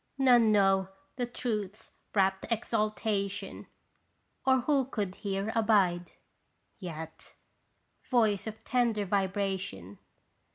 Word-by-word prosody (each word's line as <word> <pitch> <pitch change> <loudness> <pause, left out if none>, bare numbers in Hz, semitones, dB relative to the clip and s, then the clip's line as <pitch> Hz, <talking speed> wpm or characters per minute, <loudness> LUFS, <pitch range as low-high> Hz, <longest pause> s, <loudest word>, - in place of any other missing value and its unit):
None 245 -5 +5
know 195 -2 +3 0.3
the 245 -2 -2
Truth's 215 -4 -4 0.2
rapt 190 -1 +2
exaltation, 215 -3 -2 0.8
or 260 -1 +5
who 275 0 +2
could 205 -7 -3
here 200 +1 -3
abide? 195 -6 +2 0.7
Yet 160 -4 -8 0.7
Voice 220 -5 +2
of 220 0 -7
tender 235 -5 +1
vibration 190 - -2
205 Hz, 90 wpm, -30 LUFS, 190-230 Hz, 0.8 s, None